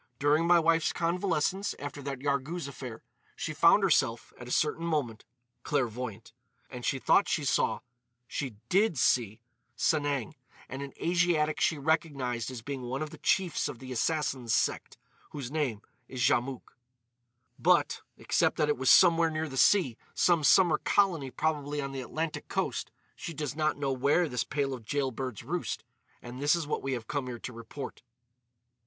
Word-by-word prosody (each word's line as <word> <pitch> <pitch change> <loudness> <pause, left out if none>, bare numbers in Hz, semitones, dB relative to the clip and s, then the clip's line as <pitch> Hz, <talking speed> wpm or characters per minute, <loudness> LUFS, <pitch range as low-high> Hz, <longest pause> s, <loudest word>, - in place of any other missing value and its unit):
"During 150 +4 +2
my 175 0 +6
wife's 165 -1 +2
convalescence 180 +2 0
after 145 0 -7
that 135 -2 -5
Yarghouz 140 +3 -2
affair, 125 -4 -8 0.3
she 155 - -4
found 170 +6 +5
herself, 130 -10 +1
at 125 - -9
a - - -7
certain 155 +4 +1
moment, 145 -10 -2 0.4
clairvoyant. 120 -5 -3 0.4
And 125 -2 -7
she 135 - 0
thought 180 +8 +3
she 150 - 0
saw—she 125 -1 -3
did 195 -3 +2
see—Sanang, 120 +4 0 0.3
and 135 +2 -6
an 140 -1 -7
Asiatic 165 -3 +1
she 160 - +2
recognised 140 -6 -1
as 125 -3 -7
being 140 0 -5
one 130 +4 -3
of 155 - -7
the 160 - -11
chiefs 175 +2 +1
of - - -7
the 130 +1 -9
Assassins 130 -2 0
sect, - - -1 0.4
whose 140 -4 -5
name 135 -9 -2 0.2
is 130 - -8
Djamouk. 125 +1 0 0.8
"But, - - +3 0.2
except - - +1
that 150 - +2
it 150 - +1
was 130 - +2
somewhere 170 -2 +6
near 160 0 -2
the 135 - -8
sea—some 165 - +2
summer 170 +1 +5
colony 175 -9 +2
probably 150 0 -2
on 140 -1 -3
the 135 -1 -4
Atlantic 155 +5 -4
coast—she 165 - -5
does 145 -2 -3
not 155 -1 0
know 140 -2 -1
where 140 +7 +2
this 125 -5 -1
pair 140 -2 -1
of 125 -3 -7
jailbirds 130 -2 -3
roost. - - -3 0.4
And 125 +2 -8
this 145 +3 +4
is 170 -2 -2
what 150 - -2
we 135 0 -2
have 120 -3 -4
come 140 +2 -3
here 120 -1 -5
to 125 - -7
report." 115 +4 -8
140 Hz, 160 wpm, -29 LUFS, 125-160 Hz, 0.8 s, my